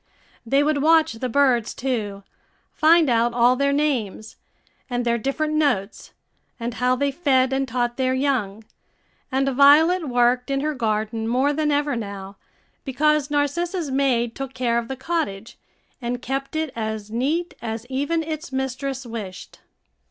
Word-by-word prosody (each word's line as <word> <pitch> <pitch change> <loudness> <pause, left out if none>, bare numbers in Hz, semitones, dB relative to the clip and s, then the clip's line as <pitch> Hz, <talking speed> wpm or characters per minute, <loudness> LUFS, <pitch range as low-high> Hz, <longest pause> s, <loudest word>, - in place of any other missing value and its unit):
They 275 +4 +3
would 295 -1 +1
watch 320 -1 +4
the 250 +3 -4
birds 245 -3 +2
too, 210 -7 -3 0.5
find 325 0 +5
out 235 -1 +2
all 245 +1 +4
their 280 +2 +1
names, 255 -8 -1 0.5
and 245 -1 -2
their 235 0 +1
different 305 +6 -1
notes, 280 -10 -1 0.5
and 235 +1 -3
how 250 +1 +1
they 280 +2 0
fed 265 -4 +2
and 270 0 0
taught 240 0 -1
their 260 -1 +1
young; 240 -7 -1 0.7
and 270 +1 +1
Violet 295 +5 +5
worked 245 +1 +2
in 275 0 0
her 305 +1 -1
garden 220 -2 -2
more 260 +5 +2
than 300 0 0
ever 290 -1 +1
now, 200 -3 -6 0.5
because 300 +2 +1
Narcissa's 295 +3 -1
maid 250 -4 +1
took 270 0 -7
care 240 -2 +1
of 235 - -6
the 265 - -5
cottage, 245 -9 -3 0.4
and 245 0 -3
kept 270 +3 -4
it 315 -4 -2
as 220 -2 -4
neat 295 +9 -1
as 225 0 -5
even 285 +5 -1
its 315 0 -6
mistress 265 0 -3
wished. 205 -5 -8
260 Hz, 150 wpm, -23 LUFS, 235-290 Hz, 0.7 s, find